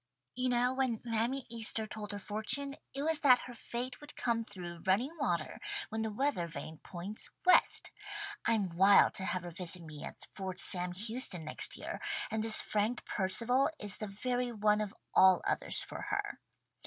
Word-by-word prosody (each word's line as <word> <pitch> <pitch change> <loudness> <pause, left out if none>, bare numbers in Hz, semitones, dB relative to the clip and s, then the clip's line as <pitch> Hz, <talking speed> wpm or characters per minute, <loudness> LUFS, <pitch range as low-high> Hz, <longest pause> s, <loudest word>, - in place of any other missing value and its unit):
You 255 0 -1
know 245 +1 +2
when 260 -4 0
Mammy 240 +3 -1
Easter 225 -1 +1
told 215 -1 -7
her 205 - -5
fortune, 220 +8 0 0.2
it 275 - -4
was 320 0 +1
that 255 -4 +6
her 245 - -9
fate 245 +2 -5
would 295 0 -10
come 230 -1 0
through 175 -5 -8
running 240 - +1
water 170 - -1 0.3
when 220 0 -3
the 220 -1 -2
weather 240 -6 0
vane 160 -1 -8
points 190 +4 -5 0.2
West. 365 - +4 0.5
I'm 205 -7 +1
wild 195 +3 +6
to 190 - -2
have 185 -2 -1
her 175 - -7
visit 180 0 -2
me 155 -2 -9
at - - -7
Fort 190 -2 -5
Sam 180 -1 +5
Houston 210 -4 +2
next 155 - +1
year, - - -6 0.3
and 220 0 -1
this 220 -1 +5
Frank 215 +3 -1
Percival 230 +9 +2
is 205 -1 0
the 215 - -4
very 245 +5 -2
one 210 -1 +2
of 210 -2 -3 0.2
all 190 -1 +6
others - - +1
for - - -8
her. - - -3
215 Hz, 180 wpm, -32 LUFS, 190-245 Hz, 0.5 s, that